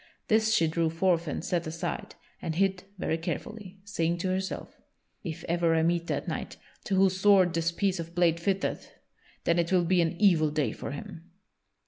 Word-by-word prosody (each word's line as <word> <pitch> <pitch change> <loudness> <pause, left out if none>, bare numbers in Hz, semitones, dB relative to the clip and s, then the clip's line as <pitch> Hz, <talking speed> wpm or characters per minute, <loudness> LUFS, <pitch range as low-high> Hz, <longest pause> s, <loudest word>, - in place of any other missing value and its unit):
This 220 0 +3
she 165 -7 +4
drew 165 0 +1
forth 170 0 +1
and 155 - -3
set 175 -2 -1
aside, 165 +1 -4 0.3
and 160 - -3
hid 190 +1 +1
very 165 -2 -1
carefully, 200 +3 -5
saying 170 -4 -1
to 185 +2 -2
herself: 190 +1 -4 0.4
"If 160 -2 -5
ever 170 -1 +1
I 160 - +3
meet 170 0 +1
that - - -2
knight - - -4 0.3
to 195 - 0
whose 190 0 +3
sword 195 -4 +5
this 165 0 +1
piece 190 0 0
of 165 0 -7
blade 170 -2 +3
fitteth, 190 +2 -1 0.5
then 170 +1 +2
it 170 +1 0
will 180 -2 +3
be 180 +1 +3
an 170 +1 -1
evil 170 -7 +4
day 145 -6 0
for - - -6
him." 165 +4 -8
170 Hz, 185 wpm, -28 LUFS, 165-190 Hz, 0.5 s, sword